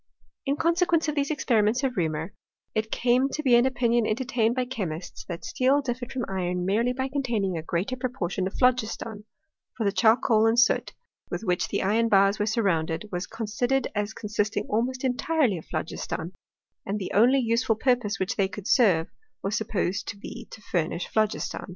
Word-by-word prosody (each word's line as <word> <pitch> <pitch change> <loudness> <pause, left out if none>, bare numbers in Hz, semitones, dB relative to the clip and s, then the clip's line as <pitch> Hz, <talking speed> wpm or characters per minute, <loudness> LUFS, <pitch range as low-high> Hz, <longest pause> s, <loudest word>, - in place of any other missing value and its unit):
In 280 - +2
consequence 335 +1 +2
of 300 - 0
these 285 -1 0
experiments 240 -4 +1
of 260 -2 0
Reaumur, 160 0 -1 0.4
it 220 0 -1
came 250 +4 +2
to 305 - -4
be 255 -4 +3
an 240 +2 +6
opinion 240 -3 +1
entertained 235 0 0
by 255 -1 0
chemists, 180 -9 -5
that 170 -2 -6
Steel 275 -4 +2
differed 245 -3 -4
from 255 -3 -2
iron 180 -2 -2
merely 225 +6 +2
by 260 +1 -2
containing 240 -9 -1
a 160 - -2
greater 175 +10 -2
proportion 235 -8 -2
of 195 - -7
phlogiston; 225 -4 0 0.5
for 230 - -1
the 200 - +2
charcoal 220 +2 +4
and 230 +1 +3
soot 240 - +3 0.4
with - - -4
which 180 -4 0
the 200 - -1
iron 225 +4 +2
bars 195 0 +4
were 210 - 0
surrounded 185 -5 0
was 180 0 -3
consi 225 +1 -2
dered 270 +1 +1
as 210 0 -1
consisting 210 0 -2
almost 250 +5 -1
entirely 260 - +1
of - - -14
phlogiston; 160 +1 -4 0.5
and 200 +2 -2
the 195 - -5
only 245 +6 +5
useful 230 -2 +1
purpose 240 -3 +1
which 190 - -2
they 195 - +3
could 195 0 -9
serve, 185 -10 +4 0.4
was 200 +2 -1
Supposed 200 -3 -1
to 205 - -5
be 200 - -9
to 220 - -11
furnish 170 -3 -2
phlogiston. 215 -1 -1
220 Hz, 180 wpm, -26 LUFS, 195-250 Hz, 0.5 s, an